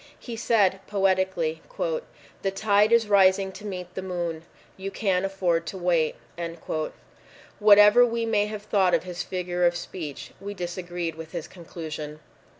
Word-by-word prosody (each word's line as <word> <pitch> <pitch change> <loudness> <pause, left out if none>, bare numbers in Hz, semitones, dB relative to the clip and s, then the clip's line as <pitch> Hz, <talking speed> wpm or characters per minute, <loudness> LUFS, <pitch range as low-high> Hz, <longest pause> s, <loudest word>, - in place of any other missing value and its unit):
He 235 - -7
said 205 -4 +2
poetically, 190 -5 +1 0.8
"The 195 - +1
tide 205 +2 +3
is 235 -2 +4
rising 195 -1 +4
to 210 +2 -11
meet 180 -2 -6
the 190 - -4
moon.... 175 -3 -4 0.3
You 195 +1 -5
can 195 -3 0
afford 180 -4 0
to 190 - -5
wait" 170 -3 +1 1.4
Whatever 210 +2 +8
we 230 -1 0
may 210 -2 +2
have 210 -1 -6
thought 190 -4 +3
of 165 - -1
his 180 -1 -5
figure 180 -1 -2
of 175 0 +4
speech, 165 -4 -6
we 200 +1 -6
disagreed 175 -2 -4
with 160 +1 -10
his 170 -3 -4
conclusion. 155 -3 -7
185 Hz, 150 wpm, -26 LUFS, 175-205 Hz, 1.4 s, Whatever